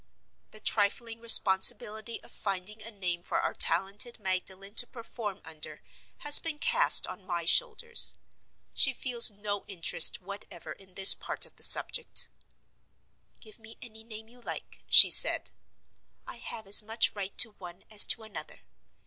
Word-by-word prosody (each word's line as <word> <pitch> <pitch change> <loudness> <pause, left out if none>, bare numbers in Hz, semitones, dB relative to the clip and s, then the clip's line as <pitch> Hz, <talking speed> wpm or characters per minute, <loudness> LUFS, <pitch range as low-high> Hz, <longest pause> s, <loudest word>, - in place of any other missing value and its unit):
The 215 - -11
trifling 225 +2 -4
responsibility 220 +1 +3
of - - -16
finding 200 +2 -8
a 225 - -9
name 180 -5 -6
for - - -6
our - - -5
talented 195 +8 -3
Magdalen 190 0 -7
to 245 - +3
perform 225 -4 -11
under 160 -1 -11 0.4
has 295 0 +3
been 320 -2 -7
cast 485 +10 +1
on 195 - -13
my 175 -3 -7
shoulders. 470 - 0 0.6
She 270 -2 0
feels 240 -2 +3
no 205 -1 -9
interest 170 -3 +2
whatever 185 -4 -13
in 190 +1 -24
this 195 0 +10
part - - -8
of - - -21
the - - -13
subject. - - +1 1.1
"Give 215 0 -16
me 225 0 -17
any 220 -2 -16
name 220 -1 -13
you 245 +2 -20
like," - - -11
she - - +7
said; - - +3 0.7
"I - - -11
have 220 -2 -10
as 195 +1 0
much 225 +2 -2
right 200 -1 -10
to 225 - +3
one 175 0 -15
as 210 -1 +2
to 225 - -3
another. 215 -1 -13
210 Hz, 155 wpm, -25 LUFS, 190-230 Hz, 1.1 s, this